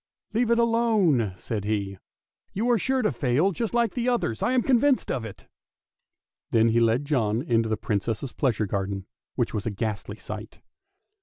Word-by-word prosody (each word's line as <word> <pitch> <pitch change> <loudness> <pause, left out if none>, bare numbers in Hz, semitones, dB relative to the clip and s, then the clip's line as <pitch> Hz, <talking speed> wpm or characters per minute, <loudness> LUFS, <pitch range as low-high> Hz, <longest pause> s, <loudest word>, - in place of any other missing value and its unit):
" - - -45
Leave 230 +1 +1
it 235 - +4
alone! 220 - +2
" - - -25
said 105 +1 -4
he; 100 -2 -2 0.3
" - - -51
you 220 +5 0
are 235 - +3
sure 265 +4 +1
to - - +2
fail 130 +8 +1
just 225 +4 -3
like 235 -3 +2
the 245 0 0
others, 175 - -1
I 250 - +1
am 250 -2 +3
convinced 270 +1 +3
of 125 - -2
it! 110 -3 -9 0.5
" - - -59
Then 115 0 +4
he 115 +1 +3
led 115 +4 +2
John 120 -5 0
into 115 -7 +1
the 110 - 0
Princess' 110 +5 -2
pleasure 115 -6 0
garden, 95 0 -3 0.3
which 120 -3 -1
was 105 0 -3
a - - +2
ghastly 105 0 -4
sight. - - -8
120 Hz, 200 wpm, -26 LUFS, -, 0.5 s, it